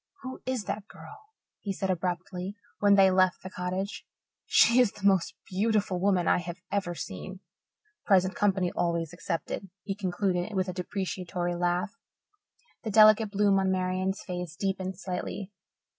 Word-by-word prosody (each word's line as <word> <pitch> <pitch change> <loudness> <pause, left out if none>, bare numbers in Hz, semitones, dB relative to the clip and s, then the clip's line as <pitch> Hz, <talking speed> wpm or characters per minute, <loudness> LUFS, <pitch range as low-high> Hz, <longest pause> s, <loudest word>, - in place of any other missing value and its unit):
"Who 260 0 -7
is 255 -4 -1
that 205 0 -4
girl?" 430 0 -13 0.3
he 200 - -4
said 190 0 -1
abruptly, 180 +2 -3 0.2
when 205 -1 +5
they 195 -1 +7
had 190 - +4
left 185 -1 +3
the 185 - -7
cottage. 185 +3 -3 0.4
"She 235 +2 +6
is 245 -5 +4
the 200 - -7
most 190 -3 +3
beautiful 200 -1 0
woman 185 -2 +2
I - - +4
have 175 0 -6
ever 195 -4 -1
seen 165 - -7 0.7
present 185 -1 +4
company 190 -3 +1
always 170 -1 -1
excepted," 175 +2 -4
he 200 - -2
concluded, 190 0 -1
with 190 0 +1
a 185 - -3
depreciatory 180 -1 -3
laugh. 175 +3 0 0.9
The 225 - -4
delicate 215 0 +6
bloom 200 -1 +3
on 190 0 +1
Marian's 185 +1 -1
face 180 -3 -5
deepened 190 0 -2
slightly. 185 +2 -5
190 Hz, 155 wpm, -28 LUFS, 180-200 Hz, 0.9 s, they